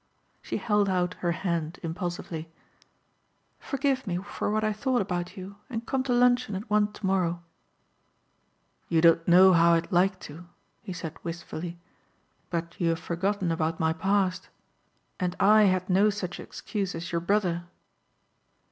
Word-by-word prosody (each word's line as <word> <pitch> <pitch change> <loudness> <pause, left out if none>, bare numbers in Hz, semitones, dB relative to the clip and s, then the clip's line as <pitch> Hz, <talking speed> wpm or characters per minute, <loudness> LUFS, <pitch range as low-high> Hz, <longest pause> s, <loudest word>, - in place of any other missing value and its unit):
She - - -3
held 210 -2 +1
out 180 -1 0
her 175 - 0
hand 170 -2 -2
impulsively. 165 -1 -4 1.1
"Forgive 270 -3 -1
me 175 -2 -1
for 200 +3 -4
what 215 +1 0
I 215 0 +1
thought 255 +3 0
about 180 0 -3
you 190 +2 -8
and 230 -2 -4
come 265 +1 0
to 260 - -1
luncheon 245 -3 +3
at 200 +5 -5
one 210 0 +3
tomorrow." 185 -4 -1 1.5
"You 165 - +3
don't 165 0 +4
know 185 +2 +7
how 170 0 +5
I'd 165 +5 -2
like 185 +1 +2
to," 165 +4 -10 0.3
he - - -7
said 165 -3 -6
wistfully, 170 0 -6 0.7
"but 170 0 -4
you 170 - +3
have 165 0 0
forgotten 185 +1 -1
about 160 0 -1
my 160 0 +2
past; 190 +2 0 0.7
and 180 -1 -1
I 210 +1 +6
had 185 -1 +1
no 195 +3 +4
such 190 -4 -4
excuse 195 -5 -4
as 165 +1 -6
your 170 0 0
brother." 175 -2 0
180 Hz, 150 wpm, -27 LUFS, 170-205 Hz, 1.5 s, know